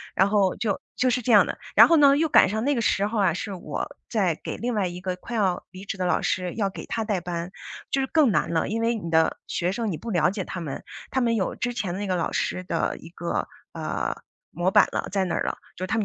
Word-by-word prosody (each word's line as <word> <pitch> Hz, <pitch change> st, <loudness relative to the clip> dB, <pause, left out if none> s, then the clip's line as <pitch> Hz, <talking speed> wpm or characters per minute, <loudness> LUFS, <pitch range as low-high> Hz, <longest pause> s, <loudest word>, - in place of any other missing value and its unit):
然 190 Hz, +2 st, +4 dB
后 200 Hz, -3 st, +2 dB
就 215 Hz, -4 st, -1 dB, 0.2 s
就 255 Hz, -, +2 dB
是 250 Hz, +1 st, +1 dB
这 245 Hz, -, 0 dB
样 205 Hz, -, +8 dB
的。 -, -, -5 dB, 0.2 s
然 -, -, +9 dB
后 330 Hz, -, +6 dB
呢 280 Hz, -1 st, +7 dB
又 315 Hz, +2 st, +1 dB
赶 -, -, +7 dB
上 220 Hz, +3 st, -2 dB
那 285 Hz, +3 st, +2 dB
个 235 Hz, -, 0 dB
时 200 Hz, -2 st, +2 dB
候 215 Hz, -1 st, 0 dB
呀， 175 Hz, -, +3 dB
是 200 Hz, +3 st, -4 dB
我 190 Hz, -, -5 dB, 0.2 s
在 190 Hz, -8 st, +1 dB
给 -, -, -4 dB
另 245 Hz, +1 st, -2 dB
外 200 Hz, -4 st, +1 dB
一 175 Hz, +1 st, -7 dB
个 185 Hz, -1 st, -2 dB
快 235 Hz, +5 st, -7 dB
要 190 Hz, -5 st, 0 dB
离 185 Hz, +1 st, -10 dB
职 200 Hz, -1 st, -5 dB
的 185 Hz, -, -1 dB
老 180 Hz, -, +2 dB
师， 180 Hz, -1 st, -1 dB
要 205 Hz, -3 st, 0 dB
给 190 Hz, -, -8 dB
他 225 Hz, -, -2 dB
带 210 Hz, -3 st, -1 dB
班， 175 Hz, 0 st, -4 dB, 0.4 s
就 270 Hz, -, 0 dB
是 265 Hz, -, -1 dB
更 300 Hz, -6 st, +4 dB
难 170 Hz, -, +1 dB
了。 165 Hz, -1 st, 0 dB
因 225 Hz, +2 st, -1 dB
为 230 Hz, +1 st, +1 dB
你 170 Hz, -7 st, -5 dB
的 160 Hz, 0 st, +3 dB
学 180 Hz, 0 st, -1 dB
生 225 Hz, -1 st, -2 dB
你 160 Hz, -, -3 dB
不 230 Hz, -, -6 dB
了 170 Hz, -2 st, +3 dB
解 195 Hz, 0 st, -3 dB
他 175 Hz, -, -5 dB
们， 145 Hz, -4 st, -5 dB, 0.3 s
他 265 Hz, -, 0 dB
们 235 Hz, -2 st, +2 dB
有 190 Hz, -, -1 dB
之 245 Hz, 0 st, -2 dB
前 190 Hz, -6 st, -2 dB
那 205 Hz, +1 st, -3 dB
个 185 Hz, -, 0 dB
老 170 Hz, -, -1 dB
师 185 Hz, -, -1 dB
的 185 Hz, -, -1 dB
一 165 Hz, -, -12 dB
个， 170 Hz, 0 st, -3 dB, 0.3 s
呃， -, -, -2 dB, 0.4 s
模 175 Hz, +3 st, +1 dB
板 -, -, +6 dB
了 -, -, -2 dB
在 195 Hz, -1 st, +1 dB
那 175 Hz, -, -2 dB
了， -, -, -2 dB, 0.2 s
就 185 Hz, +1 st, -3 dB
他 -, -, -1 dB
们 220 Hz, -, +2 dB
195 Hz, 290 characters per minute, -25 LUFS, 180-230 Hz, 0.4 s, 然